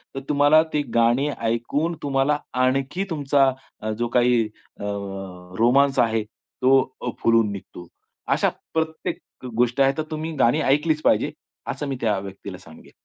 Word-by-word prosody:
तर - - -2
तुम्हाला 145 +2 +5
ती 150 - +2
गाणी 120 +4 +3 0.2
ऐकून 140 +9 -1
तुम्हाला 140 +1 +1 0.3
आणखी 135 +8 0
तुमचा 140 -4 +2 0.5
जो 120 - +1
काही 120 -1 +4 0.4
अ, - - -7 0.8
रोमान्स 135 +4 +4
आहे 115 -1 +2
तो 130 +4 +1 0.2
अ, 125 - -2
फुलून 115 -2 +4
निघतो. 95 -3 -9 0.5
अशा - - +2 0.2
प्रत्येक 160 0 -2 0.4
गोष्टी 125 +3 +2
आहेत 135 0 +3
तर 155 - 0
तुम्ही 155 +1 -3
गाणी 135 +3 +3
ऐकलीच 150 +3 +2
पाहिजे, - - +2 0.4
असं 145 - -5
मी 135 - -2
त्या 105 -3 +1
व्यक्तीला 95 -1 -8
सांगेन. 80 -2 -16
135 Hz, 145 wpm, -23 LUFS, 115-145 Hz, 0.8 s, तुम्हाला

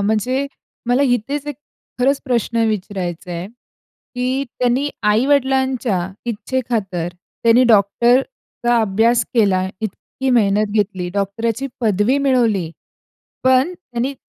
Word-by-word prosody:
म्हणजे 220 +7 0 0.4
मला 250 +3 +3
इथेच 275 +3 0
एक 295 - -4 0.4
खरंच 270 +2 +2
प्रश्न 235 -2 0
विचारायचा 185 -5 -3
आहे, 170 +1 -4 0.7
की 255 +2 -1
त्यांनी 250 +3 +1
आई-वडिलांच्या 260 -1 +2 0.3
इच्छेखातर 220 -7 -2
त्यांनी 230 +7 +1
डॉक्टरचा 240 - +2
अभ्यास 225 +3 +2
केला, 195 -5 +3
इतकी 225 +5 -4
मेहनत 210 -3 +2
घेतली, 195 -4 -1
डॉक्टरची 225 +6 -1
पदवी 220 +4 +2
मिळवली. 235 - +1 0.7
पण 260 +7 +3
त्यांनी 255 -6 -4
235 Hz, 100 wpm, -19 LUFS, 205-260 Hz, 0.7 s, मला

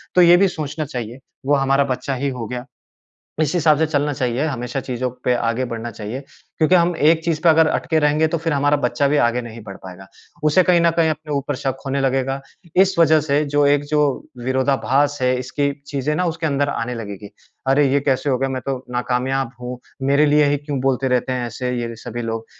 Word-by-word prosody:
तो 180 - +6
ये 175 0 +7
भी 195 +1 +4
सोचना 155 -2 -4
चाहिए 120 -2 -6 0.3
वो 145 +1 +3
हमारा 135 0 +2
बच्चा 135 +1 -4
ही 140 +2 -1
हो 125 -4 -5
गया 125 0 -5 0.8
इसी 155 +3 +1
हिसाब 155 -2 +4
से 160 - +2
चलना 145 -1 0
चाहिए 130 +1 -1
हमेशा 125 -3 -3
चीज़ों 125 0 -3 0.2
पे 125 - +3
आगे 115 +2 -1
बढ़ना 115 -1 -5
चाहिए। 110 +4 -6 0.4
क्योंकि 160 +3 +4
हम 175 0 +3
एक 160 +1 +3
चीज़ 165 -3 0
पर 170 - +6
अगर 160 0 +5
अटके 160 0 0
रहेंगे 150 +1 +2
तो 165 +1 -1
फ़िर 165 -1 -1
हमारा 145 +1 +2
बच्चा 140 +1 0
भी 145 +1 +2
आगे 120 0 +2
नहीं 115 -1 -9
बढ़ 100 -2 -9
पाएगा 95 +1 -10 0.4
उसे 155 +5 +4
कहीं 175 -1 +4
न 170 - +4
कहीं 160 -1 +4
अपने 155 -1 -6
ऊपर 140 0 -2
शक 135 -1 -3
होने 135 +1 -1
लगेगा। 135 0 0 0.4
इस 190 +1 +4
वजह 160 -1 +5
से 145 0 +1
जो 145 0 +2
एक 145 0 +3
जो 150 0 +2 0.4
विरोधाभास 135 +2 +1
है 125 0 +2
इसकी 140 +3 -1 0.2
चीज़ें 145 +1 -2
ना 180 - 0
उसके 165 -1 -2
अंदर 140 0 0
आने 125 -2 -3
लगेगी। 100 -2 -7 0.4
अरे! 140 +1 +4
ये 140 - +4
कैसे 135 0 0
हो 130 - +2
गया 135 +1 -1
मैं 130 -1 -3
तो 135 -1 -1
नाकामयाब 125 +1 -1
हूँ 125 +1 -5 0.3
मेरे 140 +2 +4
लिए 150 0 +4
ही 145 - +1
क्यों 145 -1 -4
बोलते 135 0 +1
रहते 125 0 0
हैं? 125 -1 -2
ऐसे 125 +2 -4
ये 115 0 -5
सभी 120 +1 -6
लोग, 115 -1 -4
140 Hz, 220 wpm, -20 LUFS, 125-150 Hz, 0.8 s, ये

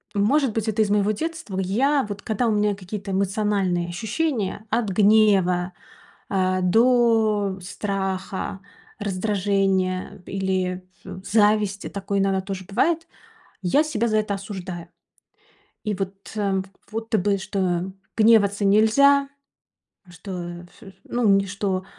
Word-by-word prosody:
может 245 +5 +2
быть, 225 0 -2
это 220 0 +1
из 210 - +2
моего 205 0 +2
детства? 270 - -4
Я, 265 +9 +1
вот, 205 0 -6
когда 220 +2 0
у - - +2
меня 210 -1 +1
какие-то 195 +1 -6
эмоциональные 195 -2 0
ощущения: 215 - -2
от 225 -2 +1
гнева, 195 -3 +3 0.6
э, 185 -1 +1
до 220 -1 +3
страха, 190 0 -3 0.4
раздражения 195 -2 0
или 185 -1 -2 0.2
ф 185 - -8
зависти, 210 -1 +2
такое 200 0 -2
иногда 195 -1 +1
тоже 190 -1 -6
бывает. 330 - 0 0.6
И - - -1
я 290 - +4
себя 235 -7 -1
за 215 -1 +1
это 210 -1 0
осуждаю. 185 -4 -7 1.0
И 210 -1 -1
вот, 195 0 -3 0.2
э, 195 -2 0 0.3
будто 225 0 -1
бы, 200 +1 +1
что 190 -2 -2 0.2
гневаться 215 -2 +4
нельзя, 275 +8 +5 0.8
что, 175 -1 -7
ф 190 +2 -15
ну, 240 -2 0
ни 195 0 +4
что 195 -1 -2
200 Hz, 125 wpm, -23 LUFS, 190-215 Hz, 1.0 s, нельзя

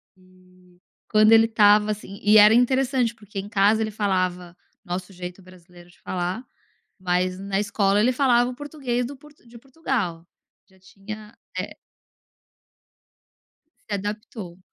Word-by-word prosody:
E 185 -1 -24 0.3
quando 215 0 +5
ele 225 0 +7
estava 210 -1 +4
assim 200 -1 -7
e 210 +1 +6
era 210 +1 +8
interessante 250 -1 +2
porque 210 -2 -8
em 200 +2 -7
casa 210 +1 +3
ele 215 - -1
falava 185 -4 -2 0.3
nosso 180 +2 -5
jeito 180 +1 -8
brasileiro 175 -1 -17
de - - -23
falar, 185 +7 -4 0.5
mas 185 0 -1
na 195 0 -2
escola 200 -1 +1
ele 245 +4 +3
falava 245 -2 +3
o - - -9
português 265 -4 -3
do 275 +2 -8
Port 295 +1 -18
de 235 0 -14
Portugal, 235 - -4 0.4
já 190 0 -25
tinha, 210 +3 -11 0.2
é - - -6 2.1
Se 205 - -1
adaptou. 205 -2 -6
205 Hz, 140 wpm, -23 LUFS, 185-230 Hz, 2.1 s, era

